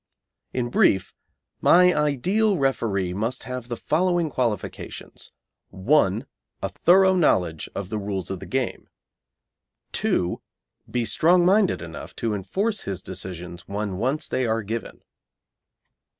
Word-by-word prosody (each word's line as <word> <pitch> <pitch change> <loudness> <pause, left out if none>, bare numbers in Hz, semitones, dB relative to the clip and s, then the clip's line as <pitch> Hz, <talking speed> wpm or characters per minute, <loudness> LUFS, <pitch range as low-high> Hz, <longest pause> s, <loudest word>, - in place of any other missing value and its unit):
In 120 -1 -2
brief, 95 -5 +3 0.5
my 180 +1 +6
ideal 180 - +1
referee 105 - 0
must 115 +6 -2
have 125 -2 -6
the 120 -1 -4
following 175 +1 +1
qualifications: 115 -7 -4 0.4
1. 105 +2 +2 0.4
A - - 0
thorough 190 +2 +5
knowledge 90 - +1
of 100 -1 -5
the 110 - -1
rules 100 -2 -3
of 95 - -4
the - - -9
game. 130 -2 -2 1.0
2. 90 0 0 0.5
Be 120 -2 -1
strong 175 - +4
minded 195 - +3
enough 85 -1 -9
to 115 -2 -1
enforce 195 - -1
his 95 -2 -5
decisions 90 -2 -7
when 100 -2 -3
once 135 +8 0
they 130 -2 0
are 110 0 0
given. 110 +3 -5
120 Hz, 125 wpm, -24 LUFS, 95-160 Hz, 1.0 s, my